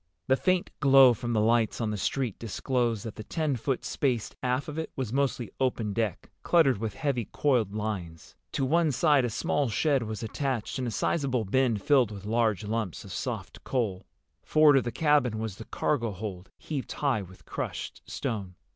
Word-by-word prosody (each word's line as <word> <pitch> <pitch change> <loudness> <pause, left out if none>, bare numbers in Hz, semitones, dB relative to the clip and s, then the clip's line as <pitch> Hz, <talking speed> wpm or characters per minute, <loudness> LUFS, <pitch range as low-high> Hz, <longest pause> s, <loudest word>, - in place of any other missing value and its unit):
The 130 - +4
faint 185 +5 +1
glow 135 -3 +7
from 120 +2 -3
the 110 - +2
lights 115 +1 +2
on 110 -2 -1
the - - -2
street 120 +2 -2
disclosed 115 0 -1
that 110 - -7
the 110 - -6
ten 155 +3 -1
foot 125 +2 -2
space 125 -6 -1
aft 125 +2 0
of 150 +1 -4
it 160 - -3
was 125 -4 -3
mostly 135 -3 0
open 120 -5 0
deck, 110 -5 -2
cluttered 145 - +4
with 110 -3 -3
heavy 135 -7 -1
coiled 120 -8 +1
lines. 95 -7 -5 0.2
To 135 - 0
one 160 +3 +3
side 140 0 +3
a - - -1
small 135 +4 0
shed 140 +4 +2
was 110 0 -4
attached 130 0 -2
and 125 - -1
a - - 0
sizable 125 +2 0
bin 125 +2 +2
filled 125 +2 +3
with 100 -2 -9
large 110 -1 +1
lumps 105 -4 -3
of - - -8
soft - - -5
coal. 105 -8 -2 0.3
Forward 155 -2 +5
of 130 - +1
the 120 - -2
cabin 145 -7 +2
was 110 -3 -4
the 110 - -9
cargo 120 -6 0
hold, 95 -2 -6
heaped 145 -4 -5
high 135 -7 0
with 95 -1 -13
crushed - - -5
stone. 95 -5 -4
120 Hz, 190 wpm, -28 LUFS, 110-135 Hz, 0.3 s, glow